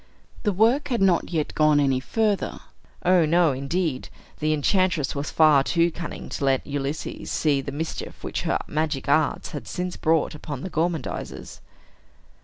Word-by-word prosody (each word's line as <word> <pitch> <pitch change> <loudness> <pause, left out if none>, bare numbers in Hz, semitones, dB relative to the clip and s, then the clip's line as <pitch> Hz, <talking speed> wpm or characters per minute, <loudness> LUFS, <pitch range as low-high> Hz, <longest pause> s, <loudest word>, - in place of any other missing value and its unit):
The 210 - +1
work 225 +9 +3
had 240 -4 -1
not 190 -3 +3
yet 160 -4 -2
gone 155 -1 +4
any 135 -2 +2
further. 210 - -1 0.5
O, 180 -1 +5
no, 165 0 +3
indeed. 140 +2 -2 0.3
The 155 0 +1
enchantress 155 0 +1
was 140 0 -3
far 155 -4 +5
too 170 +3 +2
cunning 170 +1 -7
to - - -4
let 135 -1 +2
Ulysses 145 +1 -4
see 145 -3 +1
the 140 - -6
mischief 160 +3 -5
which - - -3
her - - +1
magic 150 -3 -2
arts 145 +1 +1
had 145 - -7
since 180 0 -4
brought 160 -1 +1
upon 150 -3 -6
the 185 - -6
gormandizers. 160 -3 -3
155 Hz, 160 wpm, -24 LUFS, 145-175 Hz, 0.5 s, O